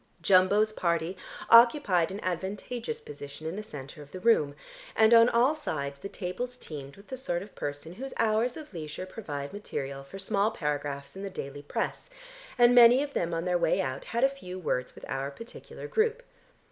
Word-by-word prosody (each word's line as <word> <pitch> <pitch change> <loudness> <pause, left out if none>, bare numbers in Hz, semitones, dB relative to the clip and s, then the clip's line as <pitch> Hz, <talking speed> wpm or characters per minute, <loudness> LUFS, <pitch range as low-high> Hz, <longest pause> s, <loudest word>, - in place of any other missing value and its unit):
Jumbo's 200 +3 +5
party 170 -1 0 0.4
occupied 230 - +6
an 195 +1 -5
advantageous 205 - -3
position 145 - -10
in 160 +3 -3
the 210 - -4
centre 145 -6 -9
of 145 0 -13
the 185 - -7
room, 180 -9 +3 0.4
and 220 +1 +6
on 230 +1 +8
all 245 +5 +4
sides 140 - -4
the 200 - -6
tables 215 +8 -4
teemed 140 - -8
with 200 +1 -17
the 260 - -5
sort 180 -9 -2
of 205 - -14
person 145 +3 -5
whose 265 +7 -7
hours 225 +2 +2
of 305 -7 -10
leisure 160 +2 -6
provide 145 -8 -6
material 140 -9 -5
for 140 +8 -10
small 200 +1 +1
paragraphs 145 -4 -3
in 195 - -7
the 200 - -4
daily 145 -6 -6
press, 145 - -3 0.5
and 240 0 +6
many 245 +2 +8
of 285 -1 -6
them 170 0 -1
on 165 +1 -2
their 180 -1 +1
way - - +2
out 130 0 -2
had 235 +2 -1
a - - +8
few 265 -10 -8
words 125 -8 -2
with - - -10
our 135 +1 -2
particular 230 +12 -10
group. 445 +2 +1
185 Hz, 190 wpm, -29 LUFS, 150-235 Hz, 0.5 s, on